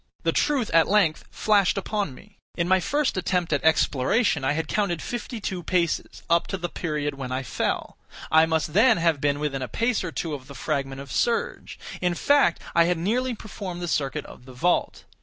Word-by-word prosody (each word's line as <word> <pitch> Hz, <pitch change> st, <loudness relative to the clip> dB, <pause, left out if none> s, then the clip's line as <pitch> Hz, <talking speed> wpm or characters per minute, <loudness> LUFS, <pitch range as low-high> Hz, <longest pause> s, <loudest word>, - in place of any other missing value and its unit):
The -, -, +2 dB
truth 275 Hz, -7 st, +1 dB
at 165 Hz, -1 st, +5 dB
length 195 Hz, -6 st, +2 dB
flashed 205 Hz, -3 st, +2 dB
upon 195 Hz, -7 st, -2 dB
me. 205 Hz, +5 st, -18 dB, 0.2 s
In 170 Hz, -1 st, 0 dB
my 190 Hz, +1 st, +4 dB
first 290 Hz, -, 0 dB
attempt 180 Hz, -3 st, 0 dB
at 145 Hz, -, 0 dB
exploration 160 Hz, -, +2 dB
I 135 Hz, -, +2 dB
had 160 Hz, 0 st, -2 dB
counted 195 Hz, -4 st, 0 dB
fifty 240 Hz, +2 st, -5 dB
two 190 Hz, -3 st, -4 dB
paces, 170 Hz, -2 st, -1 dB
up 170 Hz, 0 st, +2 dB
to 195 Hz, -, -3 dB
the 175 Hz, -1 st, -4 dB
period 150 Hz, -4 st, -2 dB
when 130 Hz, -2 st, -5 dB
I 130 Hz, +1 st, -2 dB
fell; 125 Hz, -, -2 dB, 0.3 s
I 160 Hz, +1 st, +6 dB
must 160 Hz, -2 st, -1 dB
then 225 Hz, +4 st, +5 dB
have 165 Hz, -4 st, +1 dB
been 145 Hz, 0 st, +1 dB
within 145 Hz, -3 st, -2 dB
a 130 Hz, -, -3 dB
pace 230 Hz, -, 0 dB
or 175 Hz, -, -4 dB
two 155 Hz, +3 st, -3 dB
of 130 Hz, -3 st, -7 dB
the 140 Hz, -, -11 dB
fragment 135 Hz, -3 st, -3 dB
of 140 Hz, -, -10 dB
serge; 235 Hz, -1 st, -1 dB, 0.2 s
in 180 Hz, -1 st, +1 dB
fact, 285 Hz, -, +3 dB
I 170 Hz, 0 st, +5 dB
had 175 Hz, 0 st, +1 dB
nearly 240 Hz, +8 st, 0 dB
performed 195 Hz, -4 st, -7 dB
the -, -, -2 dB
circuit 140 Hz, -5 st, -1 dB
of 125 Hz, -, -13 dB
the 130 Hz, -, -12 dB
vault. 175 Hz, +8 st, 0 dB
170 Hz, 205 wpm, -25 LUFS, 150-205 Hz, 0.3 s, I